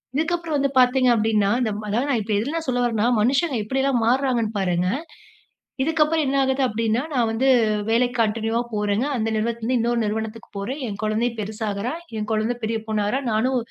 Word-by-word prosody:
இதுக்கப்பறம் 330 0 0
வந்து 275 -1 +1
பார்த்தீங்க 255 0 +4
அப்டீன்னா, 215 -2 +2
இந்த 225 -3 0 0.2
அதாவது 240 +7 0
நான் 235 -4 +1
இப்போ 215 +1 -2
எதுலா 275 +9 -3
நான் 325 - -5
சொல்ல 245 -1 +1
வரேன்னா, 230 -1 +1
மனுஷங்க 275 +6 +2
எப்படியெல்லாம் 265 0 +1
மாறாங்கன்னு 240 -4 +1
பாருங்க. 180 -1 +1 0.9
இதுக்கப்பறம் 315 0 +2
என்ன 270 - 0
ஆகுது 265 +1 0
அப்டீன்னா, 225 0 0
நான் 245 -4 +2
வந்து 225 +4 0 0.4
வேலைக்கு 245 +2 +2
கன்டினியுவா 225 +1 0
போறேங்க. 210 +3 0
அந்த 225 -1 -1
நிறுவனத்தில 230 +1 -2
இருந்து 255 0 +2
இன்னொரு 235 +1 +1
நிறுவனத்துக்கு 220 +1 -4
போறேன். 245 +9 -4
என் 205 -1 -6
கொழந்தையும் 225 +2 0
பெருசாகுறா. 215 +3 -3 0.2
என் 210 -1 -3
கொழந்தை 220 +3 0
பெரிய 225 +1 0
பொண்ணாகிறா. 215 +3 0
நானும் 255 +5 +1
230 Hz, 170 wpm, -23 LUFS, 215-265 Hz, 0.9 s, பார்த்தீங்க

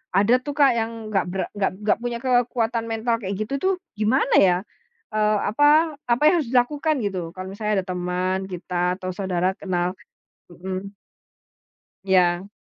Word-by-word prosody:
Ada 205 +5 +4
tuh 290 - -4
Kak 275 -2 +6
yang 225 +1 -2 0.2
nggak 195 - +2
ber 190 - -2
nggak 195 -1 0
nggak - - +3
punya 240 -1 -2
kekuatan 240 -2 +1
mental 230 +1 0
kayak 195 0 -3
gitu 215 +6 -2
tuh, 385 0 +3 0.3
gimana 240 +6 +2
ya, 180 -2 +5 0.6
eee, 215 0 +2
apa 260 +8 +2 0.5
apa 235 - +2
yang - - +6
harus 245 - -6
dilakukan 290 +5 +2
gitu, 190 -2 -2 0.2
kalau 185 0 -6
misalnya 210 -1 -1
ada - - -23
teman 180 +1 -1
kita, 180 0 -1
atau 185 -1 -5
saudara 185 -2 0
kenal? 180 -2 -1 0.6
Mhm. 190 +3 -6 1.1
Ya. 185 0 +2
200 Hz, 155 wpm, -23 LUFS, 185-235 Hz, 1.1 s, Kak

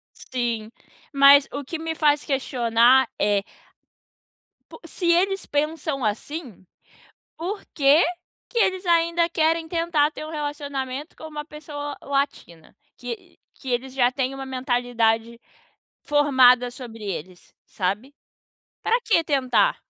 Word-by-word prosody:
Sim, 235 -4 -3 0.4
mas 280 0 +7
o 285 0 -5
que 320 +5 -5
me 325 0 -3
faz 295 -2 +2
questionar 250 -1 +3
é 205 -1 +2 1.3
po - - -13
se 355 - -4
eles 390 +3 +1
pensam, 300 -2 -2
assim, 220 - -4 0.7
por 375 +6 -4
que, 285 +3 +5 0.5
que 475 - -6
eles 375 -2 +1
ainda 335 0 +2
querem 325 0 +1
tentar, 330 -3 +1
ter 305 - -8
um 310 - -8
relacionamento 290 -1 -5
com - - -11
uma 295 -1 -7
pessoa 290 -1 -7
latina? 275 - -3 0.2
Que 245 -2 -7 0.4
eles 255 0 -2
já 250 -2 +3
têm, 265 0 -2
uma 270 0 -6
mentalidade 240 -3 0 0.6
formada 260 -4 +4
sobre 235 -3 -10
eles, 185 -2 -7
sabe. 205 +9 -3 0.7
Pra 470 +2 +2
que 390 -8 +2
tentar? 280 - +2
275 Hz, 120 wpm, -23 LUFS, 245-315 Hz, 1.3 s, mas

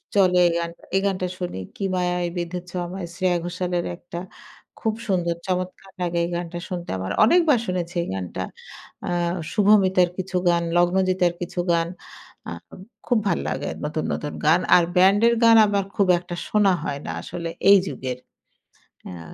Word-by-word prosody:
চলে 185 -2 +4
এই - - +1
গানটা 170 0 -6
এই 195 - +3
গানটা 185 -2 0
শুনি 180 - -4
'কি - - -7
মায়ায় 180 -1 0
বেধেছ 175 +1 -4 0.2
আমায়' 180 0 -6
শ্রেয়া 180 -1 +1
ঘোষালের 175 0 -2
একটা 175 -1 -8 0.6
খুব 220 -2 0
সুন্দর 175 -4 0
চমৎকার 185 +1 -3
লাগে 175 -1 -1
এই - - -4
গানটা 175 0 -4
শুনতে। 175 -2 -5
আমার 95 +1 -4
অনেকবার 305 +1 +4
শুনেছি 180 -1 -3
এই - - -7
গানটা 95 -2 -4 0.7
আ - - -2 0.4
শুভমিতার 195 -4 +4
কিছু 185 0 -5
গান 170 0 +2
লগ্নজিতার 180 0 +2
কিছু 175 +1 -4
গান 165 0 +1 0.6
আ - - -6 0.6
খুব 240 -3 +3
ভাল - - +1
লাগে - - -3 0.2
নতুন, 155 +1 -2
নতুন 150 - -4
গান। 160 +3 +5 0.2
আর 175 - +6
ব্যান্ডের 200 +6 +5
গান 230 0 +7
আমার 200 -1 0
খুব 200 -3 +2
একটা 175 0 -7
শোনা 210 -2 +3
হয় 145 -3 -3
না - - -3
আসলে 170 -1 -5 0.2
এই 200 - +9
যুগের। 130 -6 -4 0.9
হ্যাঁ। 85 -3 -9
180 Hz, 160 wpm, -23 LUFS, 170-190 Hz, 0.9 s, এই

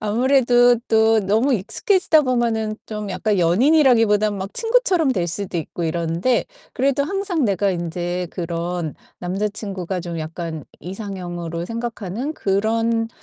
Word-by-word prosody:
아무래도 245 +2 +4
또 220 0 +4
너무 220 +8 +2
익숙해지다 320 - +2
보면은 230 -4 0
좀 210 -2 -5
약간 200 +2 0
연인이라기보다는 215 - +4
막 195 +1 -5
친구처럼 420 - +2
될 180 -7 -1
수도 180 +1 -4
있고 165 +1 -5
이러는데 170 +8 0 0.3
그래도 275 +2 +1
항상 380 -3 -1
내가 200 -2 +1
인제 175 0 -3
그런 170 -2 -3 0.2
남자친구가 195 -1 -3
좀 170 -1 -5
약간 160 -1 -5 0.2
이상형으로 175 -3 -5
생각하는 230 - -4
그런 225 +3 0
210 Hz, 320 characters per minute, -21 LUFS, 175-245 Hz, 0.3 s, 아무래도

